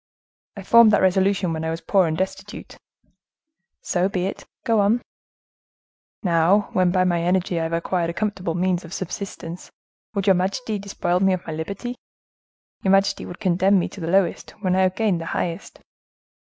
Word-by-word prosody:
"I 200 - -7
formed 235 +3 +7
that - - +4
resolution 190 -1 +2
when 160 0 -4
I 160 - -2
was 165 0 -3
poor 190 -2 +2
and 160 0 -2
destitute." 190 +2 -5 1.1
"So 180 +1 0
be 185 -2 -1
it. 195 - -6 0.2
Go 230 -4 +2
on." 210 +4 +2 1.2
"Now, 180 +3 +3
when 185 -1 +3
by 185 0 +2
my 175 -2 +1
energy 180 0 0
I - - -1
have 165 - -4
acquired 170 0 -1
a - - -3
comfortable 180 -2 -2
means 180 0 0
of 170 +1 -10
subsistence, 180 -2 -6 0.5
would 200 -1 -1
your 195 - +6
majesty 200 +4 -1
despoil 185 -3 -1
me 190 0 +3
of 185 - -4
my 160 - -5
liberty? 200 +10 -5 0.8
Your 190 - +2
majesty 195 0 +2
would 175 - -9
condemn 190 +1 +3
me 180 - +1
to 195 - -10
the 165 - -3
lowest, 185 0 +1
when 185 -2 +1
I 190 - +3
have 185 0 +2
gained 205 -7 0
the 165 - -6
highest?" 170 +2 -4
185 Hz, 180 wpm, -22 LUFS, 175-195 Hz, 1.2 s, formed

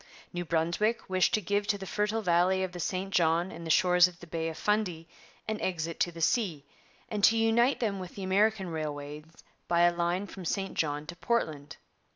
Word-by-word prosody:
New 175 0 -2
Brunswick 170 +8 0
wished 185 -1 +3
to 215 - -1
give 205 +2 -1
to 205 - +1
the 195 - -7
fertile 210 +3 -1
valley 180 +1 +3
of 185 - -3
the 180 - -8
St 190 +2 -3
John 170 +1 +2
and 170 - -8
the - - -5
shores 180 +2 +5
of 175 -1 -12
the 175 - -11
Bay 165 -1 -3
of 160 - -8
Fundy 190 -6 -1 0.4
an 215 -1 -3
exit 165 -2 -2
to 175 - +1
the 165 0 -9
sea, 165 - +1 0.4
and 210 -2 -4
to 225 - +6
unite 230 +4 +3
them 205 -5 -1
with 185 -1 -8
the 195 - -6
American 195 0 +2
railways 150 -2 -5 0.4
by 170 0 +2
a 175 0 +5
line 175 +3 -1
from 195 -1 -9
St 195 +3 -2
John 150 -1 -1
to 175 - -8
Portland. 155 -9 -2
180 Hz, 205 wpm, -29 LUFS, 165-205 Hz, 0.4 s, to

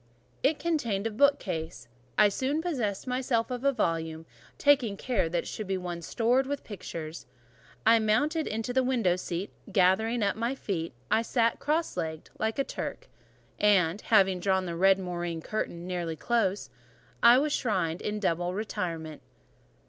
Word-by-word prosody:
It 290 +3 +2
contained 235 -12 -1
a 225 - 0
bookcase: 185 - 0 0.3
I 210 - +6
soon 265 +9 -1
possessed 250 - -2
myself 250 -2 0
of 250 0 -4
a 275 - +4
volume, 165 -8 -2 0.3
taking 265 -8 +3
care 220 -9 0
that 170 0 -1
it - - -10
should 215 - -5
be 190 0 0
one 175 -2 -5
stored 245 +9 +1
with 285 0 -3
pictures. 165 - -7 0.6
I 230 +1 +6
mounted 290 +9 +1
into 225 +3 -3
the 260 - +3
window 240 -9 +2
seat: 180 +1 -4 0.2
gathering 210 +5 +3
up 200 - +1
my 235 +4 -1
feet, 170 - -3 0.2
I 225 - +4
sat 230 0 +1
cross 315 +3 0
legged, 160 -2 -4
like 220 0 -1
a 275 - +2
Turk; - - -6 0.5
and, 195 -3 +3
having 195 -4 +3
drawn 190 0 +1
the 170 -1 -4
red 190 +2 +5
moreen 175 -3 -4
curtain 170 -1 -4
nearly 175 -3 -3
close, 205 0 0 0.5
I 235 +1 +8
was 295 +2 +1
shrined 175 -8 0
in 210 0 -2
double 175 -2 0
retirement. 165 -7 -4
205 Hz, 160 wpm, -28 LUFS, 175-245 Hz, 0.6 s, I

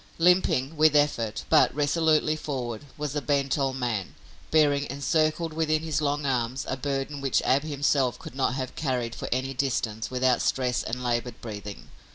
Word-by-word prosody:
Limping, 165 -5 +3
with 155 -1 +5
effort, 120 -7 +1
but - - +5
resolutely 155 +1 +2
forward, 130 -5 -4
was 150 -1 -4
a 145 - 0
bent 140 -2 +1
old 135 -2 0
man, 120 -7 -3 0.3
bearing 145 -2 +3
encircled 155 +4 0
within 155 -1 0
his 155 -2 -1
long 145 0 0
arms 125 -1 -1
a - - -1
burden 140 +1 -3
which 135 -2 +2
Ab 135 +2 +3
himself 140 -4 +1
could - - -10
not 130 -1 0
have 130 -2 -4
carried 125 -6 -2
for - - -6
any 130 +2 -1
distance 115 -5 -1
without 125 -1 +2
stress 125 -2 0
and 125 +2 -4
labored 120 -1 -2
breathing. 105 -3 -8
135 Hz, 170 wpm, -26 LUFS, 125-150 Hz, 0.3 s, with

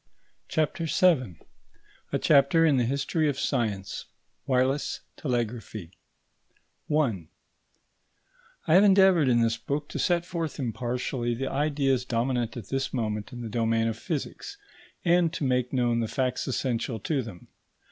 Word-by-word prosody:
CHAPTER 160 +2 -1
VII 140 - +2 0.7
A - - +1
CHAPTER 150 +3 +4
IN 145 -4 +4
THE 125 - +2
HISTORY 140 +4 0
OF 140 - -2
SCIENCE: 105 -9 -2 0.4
WIRELESS 130 +2 +1
TELEGRAPHY 120 - -3
§ - - -26 1.0
1 125 - 0 1.4
I 155 - +2
have 190 +3 +7
endeavoured 190 -6 +5
in 120 -1 +4
this 115 0 +1
book 145 +1 -3
to - - -5
set 175 -1 +1
forth 165 -5 -4
impartially 120 0 -2
the 135 +3 -3
ideas 140 -3 +1
dominant 120 -1 -1
at 110 -5 -8
this 135 0 -1
moment 105 -4 -3
in 120 -1 -7
the 115 - -5
domain 115 0 +1
of 115 - -1
physics, 170 - -5 0.5
and 170 -1 +4
to - - -3
make 125 -2 +1
known 120 -3 +1
the 115 - 0
facts 130 +1 -1
essential 125 -2 -1
to 145 +2 0
them. 110 -7 -10
130 Hz, 145 wpm, -27 LUFS, 115-150 Hz, 1.4 s, have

